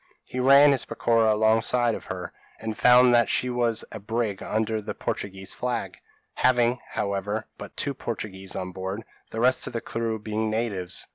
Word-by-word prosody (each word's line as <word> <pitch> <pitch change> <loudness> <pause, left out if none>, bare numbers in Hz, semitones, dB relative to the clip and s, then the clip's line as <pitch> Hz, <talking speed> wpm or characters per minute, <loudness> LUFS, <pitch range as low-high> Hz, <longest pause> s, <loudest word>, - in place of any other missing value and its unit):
He 130 - -5
ran 140 +3 +7
his 135 -3 +2
peroqua 115 -2 +2
alongside 110 +2 +3
of - - -6
her, 90 -1 -6 0.3
and 110 -1 -4
found 125 +1 +6
that 120 -1 +4
she 125 - +1
was 120 -2 0
a 110 - -6
brig 105 -1 -2
under 110 0 -1
the - - -6
Portuguese 95 -1 -4
flag, 125 -1 -3 0.3
having, 125 -1 +2
however, 100 +2 -2
but - - -10
two 140 - -1
Portuguese 95 -6 -5
on 90 0 -4
board, 95 +4 -5 0.3
the 110 - -5
rest 130 +1 +3
of - - -6
the 115 - -1
crew 115 -1 -3
being 110 +1 -2
natives. 110 -5 -2
110 Hz, 170 wpm, -26 LUFS, 105-120 Hz, 0.3 s, ran